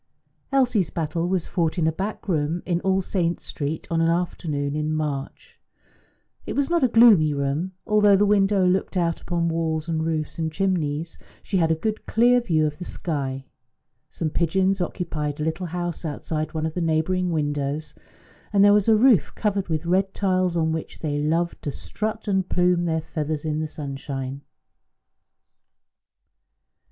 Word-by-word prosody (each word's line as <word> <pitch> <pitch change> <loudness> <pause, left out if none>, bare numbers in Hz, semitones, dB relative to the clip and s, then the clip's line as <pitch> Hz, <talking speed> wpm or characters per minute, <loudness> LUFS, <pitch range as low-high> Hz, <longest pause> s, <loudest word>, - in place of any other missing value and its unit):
Elsie's 245 - +2
battle 165 +1 -2
was 185 -3 0
fought 170 -1 -1
in 165 - +1
a 160 - +3
back 195 +7 -5
room 165 -1 0
in 175 -1 0
All 190 0 +1
Saints' 175 -2 -1
Street 150 +2 -4
on 165 0 +2
an 165 - +3
afternoon 155 -4 -1
in 155 0 -1
March. 150 -3 -4 0.8
It - - -5
was 280 +3 0
not 340 -4 +2
a - - +6
gloomy 215 -11 +6
room; 140 +7 -1
although 210 -1 +5
the 205 +2 +4
window 200 -1 +3
looked 185 +1 +1
out 170 -2 0
upon 170 -1 -1
walls 160 -1 -1
and 160 -1 -1
roofs 160 -1 -2
and 160 -1 -1
chimneys, 165 -3 -1 0.2
she 195 - -1
had 165 -2 +2
a 160 - +3
good 215 +7 -3
clear 245 +2 +4
view 160 -9 +1
of 150 +1 -3
the - - -5
sky. 135 -7 -3 0.6
Some 155 -2 -3
pigeons 190 +4 +1
occupied 155 -4 -3
a - - -1
little 160 +3 -2
house 175 0 -4
outside 155 0 -4
one 160 0 -1
of 160 - -3
the 180 - -2
neighbouring 165 +3 +1
windows, 145 -1 -2 0.6
and 200 -1 +5
there 205 - +7
was 205 0 +3
a 220 - +7
roof 220 - +4
covered 200 -3 -1
with 160 -1 -2
red 190 +3 +1
tiles 185 -3 +1
on 160 -1 +1
which 160 0 -5
they 145 -2 -1
loved 165 +3 0
to - - -3
strut 215 +9 -4
and 190 -2 0
plume 180 -1 +2
their 160 -1 0
feathers 155 -1 -4
in 155 0 -1
the 155 - -2
sunshine. 140 -2 -5
165 Hz, 170 wpm, -24 LUFS, 155-190 Hz, 0.8 s, there